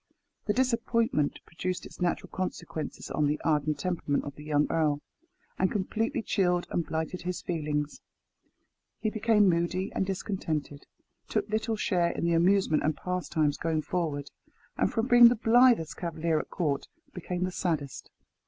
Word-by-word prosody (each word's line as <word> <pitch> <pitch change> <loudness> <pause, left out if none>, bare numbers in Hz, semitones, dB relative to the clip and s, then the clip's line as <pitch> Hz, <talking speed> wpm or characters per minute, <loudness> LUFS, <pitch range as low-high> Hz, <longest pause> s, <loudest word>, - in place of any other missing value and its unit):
The 210 - +2
disappointment 230 - +1
produced 180 +2 -4
its - - -12
natural 175 -1 -1
consequences 165 -4 -5
on 150 - +1
the 150 +1 0
ardent 150 -1 +1
temperament 175 -6 -1
of 145 - -6
the 150 - -12
young 150 -1 +2
earl, 150 -3 +1 0.6
and 190 - +3
completely 225 +5 -1
chilled 180 -4 +1
and 170 - 0
blighted 160 +3 -3
his 180 +1 -4
feelings. 150 -3 -2 1.0
He 215 - -1
became 215 -1 +3
moody 175 +2 0
and - - 0
discontented; 175 -7 -3 0.4
took 210 -2 0
little 220 +1 0
share 180 -5 +1
in 170 - -2
the 170 - +2
amusement 175 -1 +3
and 155 0 0
pastimes 165 -5 -1
going 160 -2 -1
forward; 150 -5 -2 0.4
and - - +1
from 225 0 0
being 240 -1 +9
the 240 - +4
blithest 235 -6 +4
cavalier 165 -2 -1
at - - -6
court, 150 -6 -1 0.3
became 180 0 -3
the 185 - -1
saddest. 160 -7 -3
175 Hz, 155 wpm, -29 LUFS, 155-200 Hz, 1.0 s, being